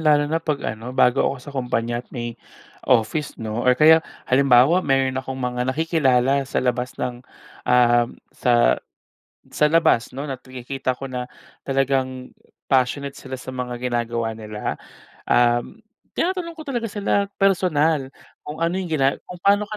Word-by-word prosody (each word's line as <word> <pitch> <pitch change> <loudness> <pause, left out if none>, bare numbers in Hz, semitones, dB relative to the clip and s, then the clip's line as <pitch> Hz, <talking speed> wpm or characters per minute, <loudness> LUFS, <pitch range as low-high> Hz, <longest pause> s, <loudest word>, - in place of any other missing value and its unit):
lalo 150 -2 +4
na 160 +2 -1
pag 150 -3 -2
ano, 115 +4 -5
bago 125 +2 +4
ako 140 - +1
sa 135 +3 -11
kumpanya 120 -2 -1
at 125 - -22
may 120 -2 -6 0.5
office 125 +5 +1
'no, 110 +1 -4
or 125 0 +3
kaya 160 +2 +7 0.2
halimbawa 135 +5 +5
meron 135 -4 +1
akong 130 0 -6
mga 125 0 -2
nakikilala 140 -3 +2
sa - - -4
labas 125 0 -1
ng, 120 -1 -4 0.5
uhm, 120 -1 +4 0.2
sa 120 -1 +3 0.7
sa 150 - +2
labas 160 -7 +3
'no, 140 - -4
at 135 -3 -5
nakikita 130 0 -4
ko 135 - -8
na 125 -1 -5 0.4
talagang 130 -1 -1 0.3
passionate 135 +2 +1
sila 130 -1 -8
sa 130 +1 -8
mga 125 -1 -4 0.2
ginagawa 115 -1 -1
nila, 105 -1 -5 0.5
uhm, 120 - +2 0.3
tinatanong 345 -2 -1
ko 315 - -9
talaga 240 -5 -3
sila 200 -1 0
personal 160 -7 +2 0.3
kung 150 +1 -8
ano 165 +1 0
yung 180 - -5
gina 140 -3 +1
kung 180 - -7
paano 200 +1 +4
ka 215 - -5
130 Hz, 155 wpm, -22 LUFS, 125-155 Hz, 0.7 s, kaya